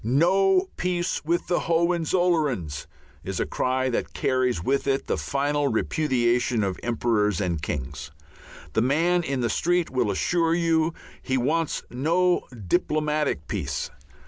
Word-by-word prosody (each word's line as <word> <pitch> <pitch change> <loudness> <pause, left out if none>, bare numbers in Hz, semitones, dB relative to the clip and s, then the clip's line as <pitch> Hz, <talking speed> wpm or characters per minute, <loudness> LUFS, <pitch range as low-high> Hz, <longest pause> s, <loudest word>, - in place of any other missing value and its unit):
"No 185 - +3
peace 180 -1 -1
with 170 +3 0
the 175 - +1
Hohenzollerns" 165 - +1 0.4
is - - -4
a - - +1
cry 130 +1 0
that 120 - -2
carries 125 -8 0
with 140 +4 0
it 135 0 +1
the - - 0
final 145 +1 0
repudiation 120 -2 +1
of 95 -2 -2
emperors 110 -5 +1
and 85 -5 -1
kings. 70 -1 -5 0.6
The 110 - +2
man 165 +8 +2
in 135 -6 -2
the 120 - +1
street 175 +5 +1
will 125 -4 +1
assure 165 - +1
you 165 -1 +1 0.3
he 130 - -1
wants 155 +6 0
no 170 +8 +1 0.2
diplomatic 150 - 0
peace. - - -3
145 Hz, 135 wpm, -25 LUFS, 120-170 Hz, 0.6 s, No